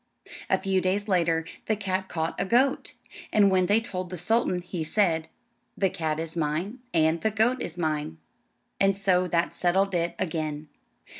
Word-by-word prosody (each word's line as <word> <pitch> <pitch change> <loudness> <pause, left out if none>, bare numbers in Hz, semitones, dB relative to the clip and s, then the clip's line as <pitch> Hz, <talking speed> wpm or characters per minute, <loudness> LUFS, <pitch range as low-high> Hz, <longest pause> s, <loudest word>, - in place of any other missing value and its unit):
A - - +4
few 190 -1 0
days 195 +3 0
later 170 -4 +2 0.2
the 220 - +2
cat 190 -2 -2
caught 160 0 -2
a - - +2
goat; 255 +7 +1 0.4
and 200 -2 +5
when 185 -1 +3
they 205 +4 +4
told 185 -5 -5
the 180 - -5
sultan 180 0 +1
he 175 -2 -4
said, 160 -2 +1 0.5
"The 195 -2 +1
cat 155 -1 -2
is 165 0 -4
mine, 165 - -2
and 160 0 +2
the 220 - +2
goat 225 +4 +1
is 175 - -5
mine;" 155 - -2 0.6
and 195 0 +3
so 185 -2 +2
that 170 -1 0
settled 190 +2 +1
it 170 -1 0
again. 155 -3 -3
180 Hz, 170 wpm, -26 LUFS, 160-200 Hz, 0.6 s, and